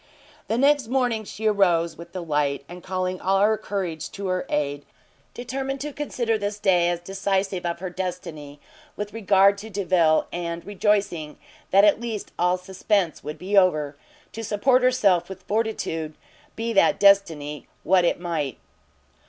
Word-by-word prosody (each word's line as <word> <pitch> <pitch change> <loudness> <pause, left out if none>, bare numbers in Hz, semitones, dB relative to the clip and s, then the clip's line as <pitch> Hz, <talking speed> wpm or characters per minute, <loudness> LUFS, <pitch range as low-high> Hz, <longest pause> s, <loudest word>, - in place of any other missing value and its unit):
The 225 - 0
next 280 -1 +3
morning 245 -3 0
she 210 +3 -7
arose 175 -6 +2
with 170 0 -11
the 185 -1 -5
light, 145 -3 0
and 180 +1 -10
calling 185 0 -3
all 195 +1 +2
her 215 +2 +4
courage 185 -7 -4
to 200 -1 -4
her 185 0 -1
aid, 145 -1 -1 0.5
determined 270 +2 -4
to 295 0 -5
consider 240 -6 -1
this 205 0 -3
day 180 -4 +3
as 175 -1 -1
decisive 195 -1 -1
of 170 - -2
her 185 -1 -4
destiny 165 -6 -6 0.4
with 205 0 -5
regard 200 -2 +4
to 220 +2 -9
Delvile, 180 -6 +2
and, 170 -1 -4
rejoicing 200 -6 0 0.3
that 195 +2 +6
at 210 +2 +3
least 225 -4 -5
all 180 +1 +2
suspense 190 -1 -1
would 150 - -6
be 195 +3 -3
over, 155 -7 +3 0.4
to 225 - -7
support 225 +5 +2
herself 200 -9 +3
with 190 -1 -9
fortitude, 195 -8 -2 0.4
be 230 +1 -2
that 200 -1 +4
destiny 160 -8 +3 0.2
what 180 +1 +4
it 175 - +1
might. 160 -7 -3
190 Hz, 160 wpm, -24 LUFS, 170-210 Hz, 0.5 s, that